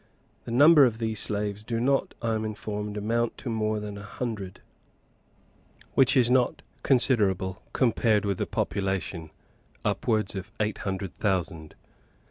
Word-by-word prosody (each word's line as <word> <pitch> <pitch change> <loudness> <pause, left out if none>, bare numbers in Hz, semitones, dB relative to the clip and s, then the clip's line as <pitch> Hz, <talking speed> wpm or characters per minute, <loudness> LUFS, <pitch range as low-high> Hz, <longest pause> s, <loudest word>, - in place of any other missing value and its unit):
The - - -6
number 145 +5 +7
of 120 -4 +2
these 110 -2 -2
slaves 105 0 -1
do 115 +1 -2
not, 135 +3 +1
I 115 -1 +1
am 110 0 -1
informed, 105 -1 -4
amount 115 +3 -1
to 125 - -5
more 110 -1 0
than 105 -1 -6
a - - -9
hundred, 105 -4 -5 1.3
which 135 +1 +4
is 125 -1 +4
not 125 -1 +2 0.2
considerable, 105 -8 +2
compared 110 -4 +2
with 100 -2 -1
the - - -1
population, 95 -4 -2 0.6
upwards 110 -4 0
of 95 +3 -6
eight 105 0 -1
hundred 95 -2 -4
thousand. 85 -6 -2
105 Hz, 140 wpm, -27 LUFS, 100-115 Hz, 1.3 s, number